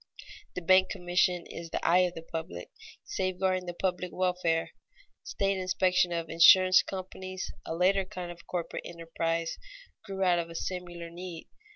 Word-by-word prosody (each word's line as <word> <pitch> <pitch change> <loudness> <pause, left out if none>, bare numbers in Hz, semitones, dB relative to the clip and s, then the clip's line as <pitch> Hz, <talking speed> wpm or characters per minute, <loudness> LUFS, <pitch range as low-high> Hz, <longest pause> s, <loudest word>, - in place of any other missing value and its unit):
The 180 - -4
bank 185 +2 +5
commission 180 0 +1
is 165 0 -8
the - - -2
eye 175 +2 +6
of 175 - -17
the 165 - -7
public, 160 - -6 0.3
safeguarding 185 -1 -1
the 175 - -5
public 180 0 -1
welfare. 180 -3 0 0.5
State 195 -1 -1
inspection 185 -1 +2
of 170 -1 -2
insurance 185 +3 +7
companies, 185 0 -6 0.2
a 165 - -3
later 190 +3 +3
kind 185 -2 -7
of 170 0 -13
corporate 175 -2 -3
enterprise, 165 0 -3 0.4
grew 195 -2 -3
out 180 -2 +4
of 170 0 -3
a 165 - -10
similar 175 -2 -5
need. 175 -1 -8
180 Hz, 155 wpm, -29 LUFS, 170-185 Hz, 0.5 s, insurance